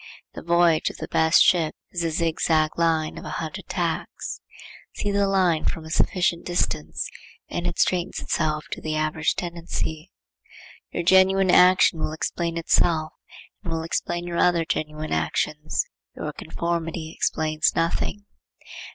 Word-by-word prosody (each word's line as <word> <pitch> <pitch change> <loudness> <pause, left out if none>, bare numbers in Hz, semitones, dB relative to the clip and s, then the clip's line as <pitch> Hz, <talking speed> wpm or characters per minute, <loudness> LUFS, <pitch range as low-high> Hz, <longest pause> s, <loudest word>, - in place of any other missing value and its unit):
The - - -7
voyage 170 -1 +3
of - - -10
the - - -6
best 160 +1 +5
ship 165 -4 +3 0.2
is 175 -1 -2
a 165 - +1
zigzag 160 -1 +1
line 165 -2 +1
of - - -10
a - - -6
hundred - - -6
tacks. - - -3 0.5
See 205 - -2
the 200 0 +2
line 185 -5 +2
from 160 - -2
a 160 - -9
sufficient 175 -1 +1
distance, 80 - -2 0.4
and 175 - -2
it 175 - -3
straightens 180 0 +1
itself 155 -2 -1
to - - -5
the 155 0 -2
average 155 +1 0
tendency. 170 -1 -4 0.8
Your 175 - -3
genuine 190 +1 +5
action 180 -2 +6
will 155 - -2
explain 170 +1 -2
itself 160 -1 +2 0.5
and - - -5
will 165 0 -2
explain 175 +1 -2
your 175 -1 -4
other 175 -2 +3
genuine 155 0 -3
actions. 150 - -1 0.3
Your - - -5
conformity 165 -1 -3
explains 155 0 +1
nothing. 170 +4 -1
165 Hz, 145 wpm, -24 LUFS, 155-175 Hz, 0.8 s, action